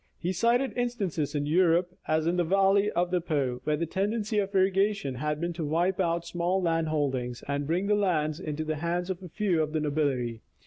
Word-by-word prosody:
He 180 +2 -2
cited 235 +6 +2
instances 200 - -2
in 145 0 0
Europe, 175 +2 +2
as 155 0 +1
in 175 +2 +1
the 175 - +3
valley 195 +3 +3
of 175 -2 0
the 180 -1 +1
Po, 140 -7 -1
where 150 -1 +1
the 170 - -1
tendency 210 +4 -1
of 200 0 -2
irrigation 195 -5 +2
had 150 +4 -2
been 170 +1 -2
to 165 -1 -4
wipe 170 +5 0
out 170 -2 0
small 175 +2 0
land 165 -3 +1
holdings, 130 -6 -2
and 140 0 -2
bring 175 +5 0
the 210 - +2
lands 165 -6 +1
into 155 -3 -3
the 155 0 -2
hands 175 +3 -1
of 185 0 -5
a 180 - -9
few 180 -2 +1
of 155 0 -2
the 160 - +1
nobility. 140 -6 -1
170 Hz, 215 wpm, -28 LUFS, 150-190 Hz, -, the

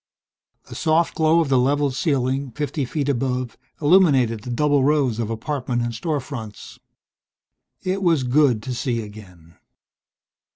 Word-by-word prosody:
The - - -10
soft 160 +1 +1
glow 160 +1 +3
of 155 - -2
the 130 -2 +3
level's 140 +1 +1
ceiling, 135 -2 0
fifty 145 0 -3
feet 145 +2 -3
above, 125 -2 -1 0.2
illuminated 145 - +3
the 125 - -9
double 145 +2 +2
rows 135 -5 +1
of 115 -2 -2
apartment 120 +1 -3
and 120 0 -3
store 150 +6 -2
fronts. 115 -6 -9 1.0
It 190 +1 -2
was 165 -7 +2
good 125 -3 +2
to 130 - -4
see 120 -1 -2
again. 90 -6 -14
135 Hz, 140 wpm, -22 LUFS, 120-150 Hz, 1.0 s, glow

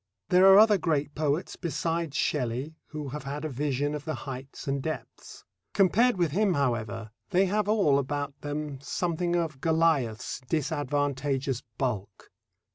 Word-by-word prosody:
There 185 +1 +6
are 190 - +9
other 210 -2 +6
great 150 -3 0
poets 150 +4 -1
besides 165 -2 -2
Shelley 130 +2 -1
who 150 -2 -6
have 150 +2 -6
had 145 +3 -4
a - - -2
vision 145 +1 -1
of 150 -1 -4
the 155 -1 -3
heights 135 +1 -7
and 135 0 0
depths. 150 -5 -7 0.3
Compared 205 +4 +4
with 170 -4 +1
him, 195 +2 +2
however, 115 -5 -1 0.2
they 190 +1 +3
have 205 +2 0
all 190 -11 +4
about 145 +1 -3
them 145 -2 -4
something 175 +4 -1
of 160 -5 -2
Goliath's 160 -10 +1
disadvantageous 145 -3 -1 0.2
bulk. 105 -6 -3
145 Hz, 145 wpm, -28 LUFS, 135-170 Hz, 0.3 s, are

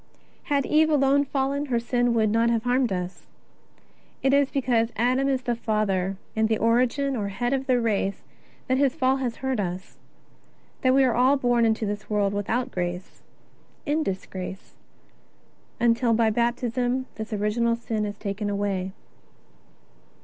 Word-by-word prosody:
Had 280 -2 +1
Eve 315 +1 +3
alone 285 -1 +3
fallen, 275 +1 -1
her 240 -3 +1
sin 240 0 0
would 215 -2 +2
not 230 +1 +3
have 230 -1 +1
harmed 250 -1 +1
us. 180 0 -4 1.0
It 270 0 +3
is 280 -1 +4
because 240 -4 +1
Adam 255 +4 +1
is 260 -2 0
the 240 -1 0
father 200 -4 -1 0.2
and 220 0 +2
the 220 - +2
origin 250 +5 +1
or 210 -4 -2
head 240 +6 -2
of 270 0 -2
the 250 -2 +3
race 205 -4 -1 0.4
that 260 +1 +1
his 275 -1 +2
fall 265 -3 +2
has 250 -3 -2
hurt 260 -3 0
us, 185 -1 -5 0.8
that 255 0 +3
we 270 - +5
are 255 -3 +3
all 260 +4 +4
born 245 -3 +2
into 220 0 +1
this 205 0 -5
world 205 -2 +1
without 220 +5 -1
grace, 180 0 -4 0.6
in 305 +1 +1
disgrace 190 -4 -5 1.1
until 235 0 +3
by 225 -1 +3
Baptism 245 +2 0
this 220 +1 -7
original 220 +3 +1
sin 225 -2 -3
is 205 -1 -4
taken 205 0 -3
away. 200 -2 -2
235 Hz, 155 wpm, -25 LUFS, 210-260 Hz, 1.1 s, we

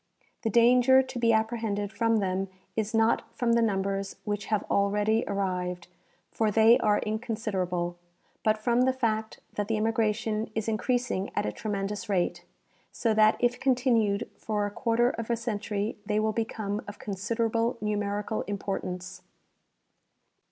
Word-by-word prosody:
The 225 - 0
danger 250 +4 +6
to 260 -1 -6
be 230 -1 +4
apprehended 220 -2 0
from 225 +1 +1
them 190 -1 -1 0.3
is 220 0 -1
not 225 +1 +3 0.2
from 235 -2 +2
the 235 - +4
numbers 195 -2 -1
which 205 -1 -2
have 215 -2 0
already 210 +3 +1
arrived, 180 -3 -2 0.4
for 220 -1 +1
they 225 +3 +6
are 210 -1 +3
inconsiderable, 195 -6 -2 0.4
but 215 0 +3
from 235 +3 +2
the 260 +1 +3
fact 220 -4 -2
that 205 -1 -2
the 220 0 0
immigration 220 0 0
is 220 0 -2
increasing 225 -2 0
at - - 0
a 105 - -1
tremendous 205 - -4
rate, 185 -3 0 0.5
so 225 -2 0
that 215 0 +5
if 245 0 +1
continued 235 -5 +2
for 210 -2 -1
a 205 - -3
quarter 235 +2 +2
of 230 0 -6
a 235 - +1
century 210 -2 -3
they 210 0 0
will 215 0 +1
become 215 -2 -2
of 205 - -8
considerable 230 +4 -1
numerical 210 0 -2
importance. 185 -3 -4
215 Hz, 145 wpm, -28 LUFS, 200-230 Hz, 0.5 s, danger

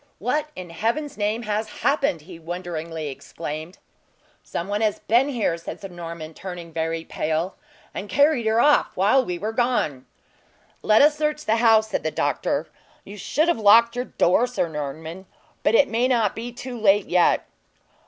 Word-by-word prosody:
"What 295 +8 -1
in 180 -2 -8
Heaven's 235 - -2
name 215 +3 -1
has 215 0 -3
happened!" 275 - +1
he 165 +2 -12
wonderingly 165 -2 -5
exclaimed. 155 +5 -7 0.6
"Some 170 - -5
one 205 +1 -1
has 215 -2 +1
been 245 +5 +2
here," 215 -10 -1
said - - -7
Sir 195 - -8
Norman, 165 -2 -8
turning 175 -2 -8
very 165 0 -2
pale, 160 +4 -2 0.4
"and 200 - -6
carried 285 +2 +3
her 220 +1 +3
off 290 +4 +3
while 210 +8 +4
we 180 -6 -3
were 215 +5 -3
gone." 220 - 0 0.7
"Let 215 +4 +5
us 295 0 +5
search 300 0 -2
the 225 - +2
house," 225 -2 +5
said - - -1
the 155 - -1
doctor; 145 0 -1 0.4
"you 200 - -10
should 295 - 0
have 345 - +1
locked 230 +3 +6
your 250 +1 -2
door, 220 +5 +2
Sir 245 -8 -1
Norman; 160 +4 -6 0.3
but 220 - +2
it 280 - +5
may 235 +2 +1
not 230 -6 +1
be 235 +2 -5
too 245 0 -7
late 205 -1 +4
yet." 175 -1 +3
205 Hz, 175 wpm, -23 LUFS, 170-240 Hz, 0.7 s, locked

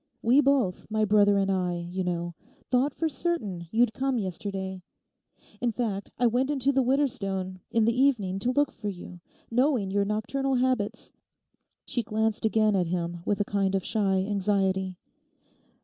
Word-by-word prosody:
We 250 +5 +5
both, 265 -10 +1
my 215 0 +1
brother 205 -1 +4
and 195 0 +1
I, 175 -2 -1
you 185 +1 -2
know, 175 -1 -2 0.4
thought 260 +3 +2
for 325 - 0
certain 215 - -2
you'd 225 +2 +2
come 265 -1 0
yesterday. 190 -1 -4 0.8
In 240 -1 +1
fact, 210 -4 -3
I 245 - +2
went 245 +4 +2
into 280 -2 +2
the 270 -1 +2
Widderstone 205 -9 -1
in 225 -1 +2
the 230 +1 +2
evening 205 -9 +2
to 240 +5 +1
look 290 +2 +2
for 210 - -5
you, 180 -2 -9 0.3
knowing 245 -5 +2
your 200 0 +2
nocturnal 260 +6 -1
habits....' 250 -5 0 0.7
She 240 - -1
glanced 220 -1 -1
again 215 -1 +3
at 180 -3 +1
him 175 0 -2
with 205 -1 +1
a - - +1
kind 195 -1 0
of 190 - -1
shy 195 -3 +1
anxiety. 190 -2 0
210 Hz, 165 wpm, -27 LUFS, 190-250 Hz, 0.8 s, We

